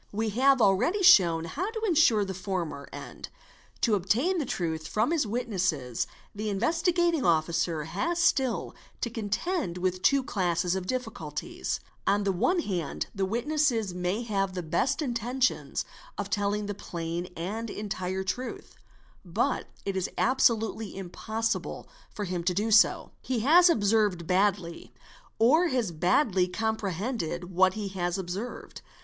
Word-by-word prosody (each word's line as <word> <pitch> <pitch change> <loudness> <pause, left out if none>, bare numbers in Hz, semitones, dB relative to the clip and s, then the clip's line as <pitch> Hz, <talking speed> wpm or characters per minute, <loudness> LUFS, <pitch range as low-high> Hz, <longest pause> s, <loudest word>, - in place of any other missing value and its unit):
We 220 +2 -1
have 260 +3 +4
already 330 - +3
shown 170 - +6
how 355 - -3
to 445 -1 -5
ensure 310 - +4
the 190 - -4
former 180 -6 -4
end; - - -8 0.5
to 230 - +3
obtain 235 - +1
the 290 - -2
truth 160 -5 -2
from 220 - +1
his 315 -9 +1
witnesses 185 - -1 0.3
the 215 +1 -3
Investigating 330 - +1
© - - -2
Officer 165 -1 +1
has 340 - -2
still 265 -7 +1 0.3
to 235 - -2
contend 225 - -2
with 185 0 -1
two 275 +4 +4
classes 175 -5 0
of 190 -1 -3
difficulties; 255 +2 -4 0.3
on 205 +1 +3
the 200 - +1
one 345 - +1
hand 180 - -3
the 195 -2 -1
witness 290 +7 +1 0.2
may 180 +5 -2
have 195 -4 -1
the 180 - -3
best 260 - 0
intentions 250 0 -1 0.3
of - - -4
telling 205 0 0
the 205 - -3
plain 170 -2 -5
and 215 +7 -4
entire 190 -3 -3
truth, 245 +7 -5 0.5
but - - -1 0.2
it 195 - -2
is 190 -1 -1
absolutely 225 -5 +1
impossible 220 +5 -3 0.2
for 205 - -5
him 180 -2 -2
so - - -11
to 180 - +2
do. 220 +2 +3
He 250 -4 -2
has 345 +8 +6
observed 205 - +2
badly 185 -2 0 0.4
or 305 +10 +5
has 245 - 0
badly 180 - +2
comprehended 195 -3 -3
what 185 +1 +3
he 210 -2 -3
has 175 -2 -2
observed. 190 +6 -6
205 Hz, 145 wpm, -28 LUFS, 180-250 Hz, 0.5 s, shown